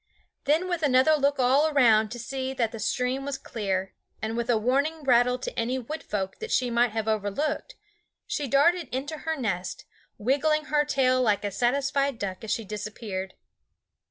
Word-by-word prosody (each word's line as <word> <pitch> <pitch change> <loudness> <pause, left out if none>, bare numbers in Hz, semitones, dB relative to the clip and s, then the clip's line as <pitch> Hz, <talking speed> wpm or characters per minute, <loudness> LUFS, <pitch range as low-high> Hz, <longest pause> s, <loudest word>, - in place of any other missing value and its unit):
Then 315 +6 +2
with 350 -3 -2
another 270 +1 +4
look 285 -1 +1
all 270 +5 +3
round 225 -6 +4
to 240 - -6
see 265 +2 -4
that 230 -4 0
the 225 - -7
stream 250 +5 -1
was 280 0 -3
clear, 195 -7 -3 0.3
and 220 +1 -3
with 235 +1 -2
a 235 - +4
warning 280 +8 0
rattle 250 -1 +4
to 255 - -5
any 245 +2 -1
Wood 295 +6 -5
Folk 190 -2 -4
that 450 - -6
she 250 -1 +1
might 240 +1 +3
have 220 0 -3
overlooked, 220 - -1 0.5
she 290 - -2
darted 300 +4 +3
into 285 +5 -3
her 320 -1 -2
nest, 195 - -3 0.3
wiggling 290 +7 +1
her 295 0 +2
tail 255 -3 +2
like 210 -5 +2
a 205 - -1
satisfied 275 +4 +1
duck 190 -2 -5
as 220 - -6
she 225 0 -1
disappeared. 210 -2 -5
255 Hz, 180 wpm, -26 LUFS, 220-280 Hz, 0.5 s, another